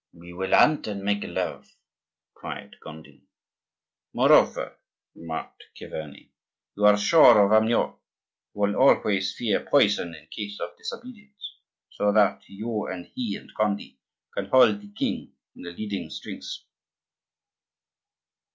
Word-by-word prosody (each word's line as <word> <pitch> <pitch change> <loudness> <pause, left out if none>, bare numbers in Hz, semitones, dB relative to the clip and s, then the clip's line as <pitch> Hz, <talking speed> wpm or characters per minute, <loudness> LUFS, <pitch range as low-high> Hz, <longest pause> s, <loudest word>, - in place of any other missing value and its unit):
"We 85 +1 -13
will 95 +2 -4
hunt 150 -5 +4
and 100 -2 -5
make 100 0 0
love!" - - -5 0.6
cried - - -9
Gondi. 80 0 -13 0.9
"Moreover," - - +3 0.3
remarked 80 -1 -8
Chiverni, 75 -3 -9 0.4
"you 105 - +1
are 105 0 +6
sure 110 -2 +6
of 100 - -1
Amyot, 110 +2 +2 0.5
who - - -13
will 100 0 +1
always 100 -7 +3
fear 115 -4 -1
poison 100 - +2
in 75 -1 -15
case 100 +5 -7
of - - -6
disobedience; 250 - -10 0.3
so 105 0 0
that 105 -2 +3
you 110 +2 -4
and 90 -1 -7
he 115 -6 -3
and - - -12
Gondi 105 -1 -2 0.3
can - - -3
hold 115 -6 +4
the 100 0 -14
king - - -4 0.2
in 85 -1 -9
leading 105 -2 -5
strings." - - -8
105 Hz, 125 wpm, -25 LUFS, 95-115 Hz, 0.9 s, are